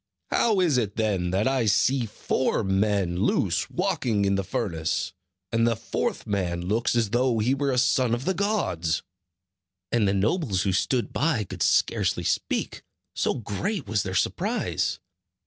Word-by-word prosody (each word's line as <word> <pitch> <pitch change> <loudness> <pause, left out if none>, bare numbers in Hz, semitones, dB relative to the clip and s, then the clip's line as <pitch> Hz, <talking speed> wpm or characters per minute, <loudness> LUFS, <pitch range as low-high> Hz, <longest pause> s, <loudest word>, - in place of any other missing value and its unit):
How 215 -4 +3
is 155 -8 +3
it 105 -4 -2
then 100 -5 0
that 95 +5 +1
I 130 -4 +1
see 120 +4 +2
four 115 +3 -1
men 95 -2 +1
loose - - +1
walking 105 -4 0
in 100 - +2
the 100 0 0
furnace; 90 -9 -2 0.4
and 115 0 +2
the 115 - +2
fourth 115 - -3
man 90 -4 -1
looks 110 +6 0
as 115 -4 +1
though 120 0 +2
he 115 +4 +2
were 140 0 0
a 125 - 0
son 125 -1 +3
of 125 +3 -6
the 190 - +1
gods?" 95 - -1 0.9
And 115 -4 +2
the 95 - +2
nobles 105 - +1
who 95 - 0
stood 120 +6 0
by 140 -7 +1
could 95 -2 -8
scarcely - - +2
speak, - - -1 0.3
so - - 0
great 160 - -3
was 105 0 +1
their 95 -1 -4
surprise. - - 0
110 Hz, 165 wpm, -26 LUFS, 95-130 Hz, 0.9 s, How